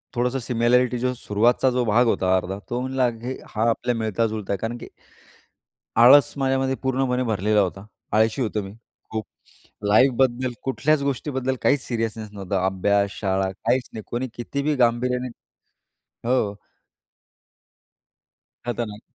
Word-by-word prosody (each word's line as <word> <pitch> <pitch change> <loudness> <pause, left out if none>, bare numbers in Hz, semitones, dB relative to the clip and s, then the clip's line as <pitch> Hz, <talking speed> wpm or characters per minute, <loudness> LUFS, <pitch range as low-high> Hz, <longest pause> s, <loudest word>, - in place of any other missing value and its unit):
थोडंसं 125 +2 0
सिमिलॅरिटी 125 +1 +2
जो 125 +1 0
सुरुवातीचा 120 +2 +2
जो 125 0 +1
भाग 115 +3 +4
होता 95 -4 +2
अर्धा, 95 +2 -4
तो 120 - -1
म्हणला 130 0 +1 0.2
हे 130 +2 -4
हा 115 +2 +1
आपल्या 120 +1 0
मिळता-जुळता 110 -2 -1
आहे - - -1
कारण 115 +3 -3
की - - -9 1.2
आळस 135 +4 +7
माझ्यामध्ये 135 -1 +1
पूर्णपणे 130 -1 0
भरलेला 105 -2 +1
होता. 95 +1 -2 0.3
आळशी 110 +4 +2
होतो 105 -2 -1
मी 95 - -8 0.4
खूप 110 -1 -3 0.6
लाईफबद्दल, 130 +2 +3
कुठल्याच 140 +2 +1
गोष्टीबद्दल 130 -1 -2
काहीच 140 -2 +3
सिरियसनेस 115 -2 -3
नव्हता. 95 -2 -2
अभ्यास, 100 +1 +1
शाळा 95 -1 0
काहीच 125 +6 -1
नाही 110 - -6
कोणी 125 +2 -2
कितीही 140 +5 -2
गांभीर्याने 125 +1 +1 1.0
हो. 115 -5 +1 2.1
खतरनाक. 110 -3 -3
120 Hz, 130 wpm, -23 LUFS, 105-130 Hz, 2.1 s, आळस